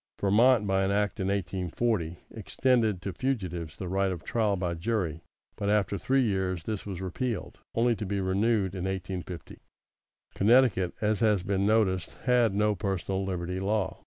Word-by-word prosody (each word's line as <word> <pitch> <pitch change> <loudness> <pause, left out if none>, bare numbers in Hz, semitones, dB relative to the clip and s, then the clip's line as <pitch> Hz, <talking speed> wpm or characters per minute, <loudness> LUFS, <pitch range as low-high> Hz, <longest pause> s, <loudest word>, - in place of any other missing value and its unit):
Vermont, 110 +3 +4
by 95 -1 +2
an 95 - +1
act 105 +1 0
in 95 - -1
1840, 95 -1 -1
extended 110 -3 +1
to 95 - -3
fugitives 90 - -3
the 95 - -5
right 95 +1 +1
of 85 -4 -5
trial 110 -4 +1
by 90 -2 -2
jury, 85 -3 -2 0.3
but 100 - -2
after 105 -1 +2
three 130 +8 +2
years 95 -5 -1
this 105 -2 -4
was 95 -3 -5
repealed, 105 +3 -3 0.2
only 115 +1 +3
to 105 -1 -5
be 100 +1 -1
renewed 95 +1 +1
in 95 -2 -4
1850. 95 -2 -5 0.7
Connecticut, 110 -4 +3
as 105 -1 +1
has 105 -5 +2
been 100 0 0
noticed, 105 -4 +1
had 120 -5 +3
no 105 +1 +2
personal 95 -1 -2
liberty 90 -1 -3
law. 100 -1 -1
100 Hz, 160 wpm, -28 LUFS, 95-110 Hz, 0.7 s, Vermont